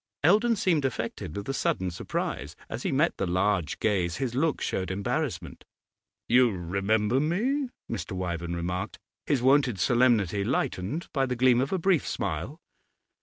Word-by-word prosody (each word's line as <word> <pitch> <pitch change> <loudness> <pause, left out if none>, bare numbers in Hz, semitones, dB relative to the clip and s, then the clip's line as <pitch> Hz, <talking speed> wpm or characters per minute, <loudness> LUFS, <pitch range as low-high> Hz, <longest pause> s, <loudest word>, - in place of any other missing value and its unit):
Eldon 215 +8 +4
seemed 170 -7 +1
affected 115 - -3
with 100 - -5
a 135 - -1
sudden 95 -8 0
surprise; 75 -3 -4
as 115 - -5
he - - -1
met 145 +5 +2
the 95 - -1
large 90 -1 +1
gaze 90 -6 0
his 130 -3 -2
look 150 +4 +1
showed 95 - -2
embarrassment. 95 +1 -3 0.6
'You 125 +1 +5
remember 100 +5 0
me?' 240 - 0 0.2
Mr. - - -4
Wyvern 85 -2 -3
remarked, 90 +2 -3 0.3
his 135 -4 +1
wonted 130 -4 +4
solemnity 115 -5 +3
lightened 130 - -2
by 135 -2 +1
the 125 - -1
gleam 125 0 +4
of 135 - -2
a 190 - +1
brief 180 -3 +2
smile. - - -3
120 Hz, 155 wpm, -27 LUFS, 95-140 Hz, 0.6 s, You